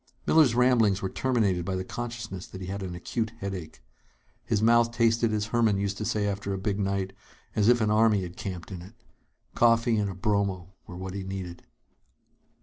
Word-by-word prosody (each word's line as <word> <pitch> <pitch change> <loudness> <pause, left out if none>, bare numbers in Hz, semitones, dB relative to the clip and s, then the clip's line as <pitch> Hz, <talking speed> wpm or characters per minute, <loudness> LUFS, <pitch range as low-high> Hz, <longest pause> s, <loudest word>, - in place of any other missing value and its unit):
Miller's 150 -8 +5
ramblings 115 -6 +3
were 95 - -2
terminated 110 -9 +1
by 95 +2 -2
the 95 - -2
consciousness 115 -4 -6
that 95 - -9
he 95 - -6
had 100 +2 -4
an 90 -2 -5
acute 110 +5 -3
headache. 95 - -6 0.6
His 105 - 0
mouth 115 +1 +4
tasted, 115 -1 +2
as 105 -1 0
Herman 115 -4 +3
used 100 0 -2
to 110 - -2
say 105 -1 0
after 100 0 -2
a - - -4
big 100 +1 -2
night, 95 -1 -1 0.4
as 105 0 +3
if 120 -1 +4
an 105 -1 +2
army 105 -2 +4
had 90 0 -7
camped 90 -1 -6
in 90 -3 -6
it. 95 +6 -13 0.6
Coffee 115 -1 +3
and 105 -1 0
a 95 - -6
bromo 95 -2 -1
were 90 - -8
what 95 0 -6
he 100 - -4
needed. 95 -2 -7
100 Hz, 195 wpm, -27 LUFS, 95-115 Hz, 0.6 s, Miller's